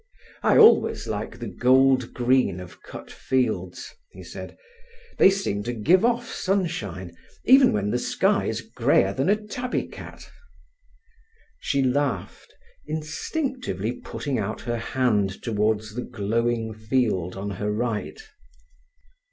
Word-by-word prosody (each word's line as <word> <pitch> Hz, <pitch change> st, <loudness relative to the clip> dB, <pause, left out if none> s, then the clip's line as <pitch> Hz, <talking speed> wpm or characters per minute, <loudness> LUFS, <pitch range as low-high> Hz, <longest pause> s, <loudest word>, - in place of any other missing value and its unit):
"I -, -, +4 dB
always 445 Hz, 0 st, +5 dB
like -, -, -4 dB
the -, -, -6 dB
gold 130 Hz, 0 st, +3 dB
green 125 Hz, -7 st, +1 dB
of 90 Hz, -1 st, -11 dB
cut -, -, -10 dB
fields," 110 Hz, -9 st, -2 dB, 0.2 s
he -, -, -12 dB
said. -, -, -9 dB, 0.6 s
"They -, -, +8 dB
seem 190 Hz, -, -1 dB
to 120 Hz, -, -2 dB
give 165 Hz, -, +3 dB
off 240 Hz, 0 st, +1 dB
sunshine 170 Hz, -, -3 dB, 0.3 s
even 265 Hz, +1 st, +7 dB
when 105 Hz, 0 st, -1 dB
the 120 Hz, -, 0 dB
sky's -, -, 0 dB
greyer 95 Hz, +1 st, +1 dB
than 135 Hz, -, 0 dB
a 205 Hz, -, +5 dB
tabby 230 Hz, +4 st, -4 dB
cat." -, -, -11 dB, 1.3 s
She 140 Hz, -1 st, 0 dB
laughed, 130 Hz, -6 st, -2 dB, 0.4 s
instinctively 155 Hz, -, -3 dB
putting 130 Hz, +1 st, -4 dB
out 110 Hz, +1 st, -3 dB
her 120 Hz, 0 st, -3 dB
hand 115 Hz, -5 st, 0 dB
towards 110 Hz, -1 st, 0 dB
the 125 Hz, -, -3 dB
glowing 115 Hz, 0 st, -1 dB
field 110 Hz, -5 st, -1 dB
on 100 Hz, +1 st, -4 dB
her 105 Hz, 0 st, 0 dB
right. 115 Hz, -, -3 dB
120 Hz, 125 wpm, -24 LUFS, 105-155 Hz, 1.3 s, They